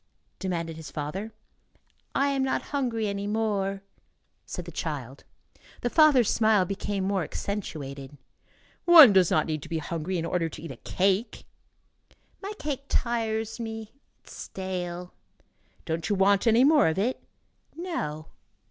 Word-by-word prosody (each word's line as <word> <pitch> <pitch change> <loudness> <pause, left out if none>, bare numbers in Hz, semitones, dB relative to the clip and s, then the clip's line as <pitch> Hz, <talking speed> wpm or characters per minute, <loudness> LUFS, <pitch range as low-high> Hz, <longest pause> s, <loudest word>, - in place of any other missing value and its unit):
demanded 170 -4 -3
his 160 -2 -8
father. 180 +9 -5 0.8
"I 280 +1 +3
am 275 -1 0
not 265 0 0
hungry 240 -6 0
any 200 0 -3
more," 200 -2 -1 0.6
said - - -6
the - - -8
child. - - -5 0.6
The 245 - -1
father's 295 -8 +5
smile 215 -4 +3
became 195 +1 -3
more 195 0 0
accentuated. 145 -7 -5 0.7
"One 320 -10 +10
does 185 -3 +5
not 155 - +2
need 155 -2 -3
to 160 - -10
be 165 - -1
hungry 165 +3 -3
in 165 - -2
order 165 -1 -1
to 155 - -10
eat 165 - -6
a 130 - -9
cake." 195 - 0 1.0
"My 400 +1 -5
cake 280 -2 -4
tires 225 -2 -1
me. 225 -1 -6 0.3
It - - -29
is - - -12
stale." 180 -2 -5 0.7
"Don't 165 +3 -2
you 205 - +2
want 200 +3 +3
any 230 +2 +5
more 295 +1 +5
of 160 - 0
it?" 235 +7 -1 0.5
"No." 155 - -4
200 Hz, 150 wpm, -27 LUFS, 170-230 Hz, 1.0 s, One